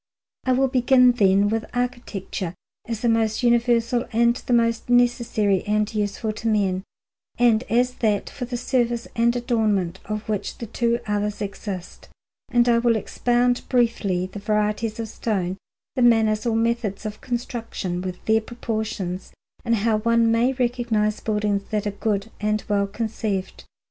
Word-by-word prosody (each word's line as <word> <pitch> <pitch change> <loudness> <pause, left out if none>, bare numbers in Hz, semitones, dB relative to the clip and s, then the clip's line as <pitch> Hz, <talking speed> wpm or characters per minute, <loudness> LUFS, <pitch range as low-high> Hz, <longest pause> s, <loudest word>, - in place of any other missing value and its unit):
I 255 - +3
will 270 +1 +3
begin, 250 0 +5
then, 200 -4 +3
with 220 +1 0
architecture, 240 -7 -3 0.3
as 230 -1 -4
the 240 - +1
most 225 0 +1
universal 235 0 +2
and 235 +1 +3
the 250 - -6
most 230 0 +2
necessary 235 -5 +2
and 210 +1 +1
useful 210 +1 -1
to 230 - -2
men, 195 -4 +1 0.6
and 235 -2 +4
as 245 +2 +2
that 210 -3 +1
for 265 -3 -5
the 245 0 -4
service 240 -1 0
and 235 +1 +2
adornment 215 -7 0
of 215 +1 -4
which 210 -2 -3
the 235 - -5
two 235 +2 0
others 210 0 -1
exist; 195 -2 -6 0.4
and 240 0 +3
I 235 -1 +4
will 235 -1 +3
expound 245 +2 +1
briefly 225 -7 +1
the 190 +2 -8
varieties 210 +2 -1
of 225 - -3
stone, 190 -4 -2 0.4
the 255 - 0
manners 225 -2 +3
or 225 - +1
methods 225 -3 -1
of 215 0 -5
construction, 230 -7 -4
with 185 -1 -6
their 220 0 +3
proportions, 215 -6 -4 0.3
and 230 -1 +2
how 215 0 +1
one 230 +1 +3
may 235 +3 +3
recognize 235 -4 0
buildings 210 -2 -1
that 210 -1 -1
are 205 - 0
good 205 +1 -2
and 210 0 0
well 200 -1 +1
conceived. 210 -2 -3
225 Hz, 155 wpm, -23 LUFS, 210-240 Hz, 0.6 s, begin